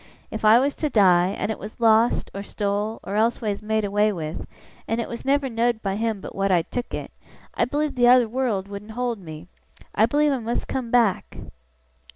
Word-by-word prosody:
If 220 Hz, -, -6 dB
I 215 Hz, +2 st, +7 dB
was 275 Hz, +3 st, +1 dB
to 305 Hz, -, -1 dB
die, 180 Hz, -7 st, +4 dB
and -, -, -2 dB
it -, -, -5 dB
was 215 Hz, +3 st, -9 dB
lost, 225 Hz, 0 st, +3 dB
or 195 Hz, -, -5 dB
stole, 205 Hz, +2 st, -3 dB
or 195 Hz, -, -6 dB
elseways 215 Hz, -1 st, 0 dB
made 215 Hz, 0 st, -1 dB
away 205 Hz, +1 st, +2 dB
with, 160 Hz, -4 st, -6 dB, 0.4 s
and 225 Hz, -, -1 dB
it 230 Hz, -, -2 dB
was 235 Hz, -, -7 dB
never 275 Hz, +1 st, +1 dB
know'd 235 Hz, -1 st, -1 dB
by 195 Hz, -1 st, -1 dB
him 220 Hz, -2 st, -2 dB
but -, -, -8 dB
what 195 Hz, 0 st, 0 dB
I'd 170 Hz, -3 st, +1 dB
took 245 Hz, 0 st, -4 dB
it, -, -, -7 dB, 0.4 s
I -, -, +1 dB
believe 295 Hz, +3 st, -1 dB
the 245 Hz, -1 st, +2 dB
t'other 245 Hz, -1 st, +6 dB
wureld 225 Hz, -5 st, -2 dB
wouldn't 205 Hz, +2 st, -9 dB
hold 245 Hz, -3 st, -2 dB
me! 160 Hz, -2 st, -10 dB, 0.5 s
I 220 Hz, +2 st, +3 dB
believe 295 Hz, +4 st, +2 dB
I 270 Hz, -, 0 dB
must 235 Hz, +1 st, -3 dB
come 255 Hz, -3 st, -3 dB
back! 230 Hz, -6 st, +1 dB
220 Hz, 205 wpm, -23 LUFS, 200-240 Hz, 0.5 s, I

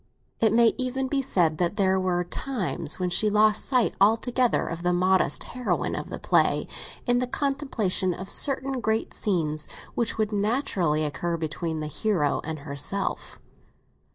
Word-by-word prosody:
It 220 Hz, -2 st, +3 dB
may 230 Hz, 0 st, +5 dB
even 260 Hz, +1 st, -1 dB
be 275 Hz, +1 st, 0 dB
said 175 Hz, -, +1 dB
that 175 Hz, +2 st, 0 dB
there 190 Hz, -2 st, +2 dB
were 180 Hz, -1 st, 0 dB
times 175 Hz, -, -1 dB
when 180 Hz, -1 st, -1 dB
she 210 Hz, +4 st, +4 dB
lost 215 Hz, +1 st, +3 dB
sight 250 Hz, -4 st, +2 dB
altogether 235 Hz, +4 st, +2 dB
of 165 Hz, 0 st, -5 dB
the 180 Hz, 0 st, +1 dB
modest 185 Hz, +1 st, +2 dB
heroine 250 Hz, 0 st, -1 dB
of -, -, -5 dB
the -, -, -5 dB
play, -, -, +2 dB, 0.4 s
in 245 Hz, 0 st, +2 dB
the 250 Hz, -, -1 dB
contemplation 270 Hz, -9 st, -1 dB
of 185 Hz, +2 st, -6 dB
certain 270 Hz, +2 st, 0 dB
great 220 Hz, +1 st, -1 dB
passages 155 Hz, -7 st, -1 dB, 0.3 s
which 235 Hz, -, -1 dB
would 215 Hz, -1 st, 0 dB
naturally 200 Hz, -, 0 dB
occur 170 Hz, +4 st, -2 dB
between 160 Hz, 0 st, -3 dB
the -, -, -3 dB
hero 150 Hz, -2 st, 0 dB
and 160 Hz, -2 st, -5 dB
herself. 145 Hz, +7 st, -3 dB
200 Hz, 155 wpm, -26 LUFS, 170-240 Hz, 0.4 s, may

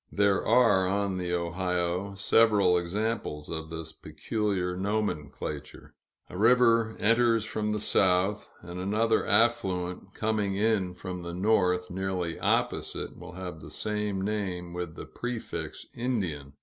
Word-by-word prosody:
There 100 Hz, -1 st, +2 dB
are, 115 Hz, -6 st, +4 dB
on 100 Hz, 0 st, 0 dB
the 90 Hz, -1 st, -2 dB
Ohio, 90 Hz, +2 st, -1 dB
several 100 Hz, -2 st, +4 dB
examples 90 Hz, -3 st, -2 dB
of 80 Hz, -1 st, -4 dB
this 80 Hz, -1 st, -6 dB
peculiar 95 Hz, -1 st, -2 dB
nomenclature: 75 Hz, -7 st, -3 dB, 0.3 s
a -, -, -11 dB
river 115 Hz, -1 st, +4 dB
enters 115 Hz, 0 st, +3 dB
from 105 Hz, 0 st, -2 dB
the 105 Hz, -, -1 dB
south, 95 Hz, +1 st, +2 dB
and 85 Hz, +1 st, -7 dB
another 110 Hz, +4 st, +1 dB
affluent 95 Hz, -5 st, +1 dB
coming 105 Hz, -3 st, 0 dB
in 100 Hz, -3 st, +1 dB
from 90 Hz, 0 st, -6 dB
the 85 Hz, 0 st, -6 dB
north, 90 Hz, -2 st, +2 dB
nearly 90 Hz, -2 st, -2 dB
opposite, -, -, -1 dB
will 90 Hz, 0 st, -10 dB
have 90 Hz, -3 st, -6 dB
the -, -, -10 dB
same 105 Hz, -2 st, -2 dB
name 95 Hz, -4 st, -3 dB
with 90 Hz, -2 st, -5 dB
the -, -, -7 dB
prefix 120 Hz, -2 st, -5 dB
"Indian." 90 Hz, -, -2 dB
95 Hz, 130 wpm, -28 LUFS, 90-110 Hz, 0.3 s, are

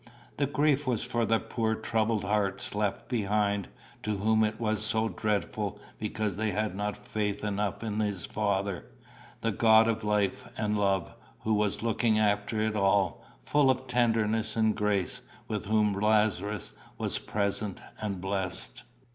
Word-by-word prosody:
The 140 Hz, -, +1 dB
grief 145 Hz, 0 st, +2 dB
was 120 Hz, -4 st, +1 dB
for 120 Hz, -1 st, 0 dB
the 115 Hz, -, +4 dB
poor 110 Hz, -1 st, -1 dB
troubled 110 Hz, -1 st, 0 dB
hearts 100 Hz, -1 st, 0 dB
left 105 Hz, -1 st, -1 dB
behind, 105 Hz, -3 st, 0 dB, 0.3 s
to 105 Hz, -1 st, -1 dB
whom 110 Hz, +2 st, +3 dB
it 105 Hz, 0 st, -1 dB
was 110 Hz, -2 st, 0 dB
so 110 Hz, +1 st, +1 dB
dreadful 105 Hz, -1 st, -2 dB, 0.2 s
because 105 Hz, -2 st, -2 dB
they 110 Hz, 0 st, 0 dB
had 105 Hz, 0 st, -1 dB
not 105 Hz, +1 st, -2 dB
faith 105 Hz, -1 st, -2 dB
enough 105 Hz, +1 st, -1 dB
in 110 Hz, -1 st, -2 dB
his 100 Hz, -4 st, -1 dB
Father, 100 Hz, -3 st, -1 dB, 0.6 s
the 115 Hz, -, +1 dB
God 110 Hz, +1 st, +6 dB
of 115 Hz, -1 st, 0 dB
life 105 Hz, -1 st, 0 dB
and 105 Hz, -1 st, 0 dB
love, 100 Hz, -5 st, +1 dB, 0.3 s
who 110 Hz, -, +1 dB
was 105 Hz, 0 st, 0 dB
looking 115 Hz, -1 st, +2 dB
after 105 Hz, +1 st, +1 dB
it 110 Hz, 0 st, 0 dB
all, 100 Hz, -3 st, +2 dB, 0.2 s
full 145 Hz, -, +3 dB
of 130 Hz, 0 st, +1 dB
tenderness 115 Hz, -3 st, +1 dB
and 110 Hz, -1 st, +2 dB
grace, 105 Hz, -3 st, 0 dB, 0.3 s
with 105 Hz, -1 st, -3 dB
whom 105 Hz, 0 st, +2 dB
Lazarus 105 Hz, -1 st, +1 dB, 0.2 s
was -, -, -1 dB
present 100 Hz, -1 st, -2 dB, 0.2 s
and 100 Hz, -3 st, -2 dB
blessed. 95 Hz, +3 st, -1 dB
105 Hz, 155 wpm, -29 LUFS, 100-110 Hz, 0.6 s, God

